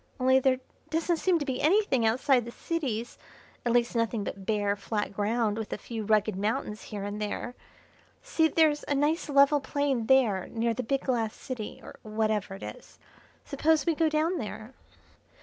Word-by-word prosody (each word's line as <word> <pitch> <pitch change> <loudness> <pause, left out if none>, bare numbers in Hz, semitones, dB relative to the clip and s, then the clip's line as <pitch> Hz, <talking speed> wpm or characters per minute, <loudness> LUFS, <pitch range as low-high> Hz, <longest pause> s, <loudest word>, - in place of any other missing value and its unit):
Only 260 +1 +5
there 260 -1 +2 0.3
doesn't 330 +1 0
seem 365 +1 +2
to 295 - -3
be 260 -2 -2
anything 305 - +3
outside 250 +2 +3
the - - -6
cities, 245 -8 -3 0.4
at 240 - +1
least 240 0 +2
nothing 230 -2 0
but 195 -1 -7
bare, 205 -2 +1
flat 205 0 -3
ground 215 +1 0
with 220 - -5
a - - -2
few 225 -3 -6
rugged 215 -1 +2
mountains 210 +2 -2
here 205 -2 -6
and 205 +1 -4
there. 210 +3 -3 0.7
See, 330 -10 +2
there's 310 -2 +3
a 285 - +1
nice 300 +4 +1
level 280 +1 +5
plain 270 -4 -1
there 225 -9 +3
near 230 0 -1
the 240 - -3
big 270 +3 -1
glass 230 -4 -1
city, 250 -6 -6
or - - -12
whatever 215 -2 -1
it 195 - -10
is. - - -10 0.5
Suppose 300 +1 +2
we 335 - +3
go 320 0 +2
down 315 +3 +1
there." 220 +1 -7
245 Hz, 180 wpm, -28 LUFS, 215-290 Hz, 0.7 s, Only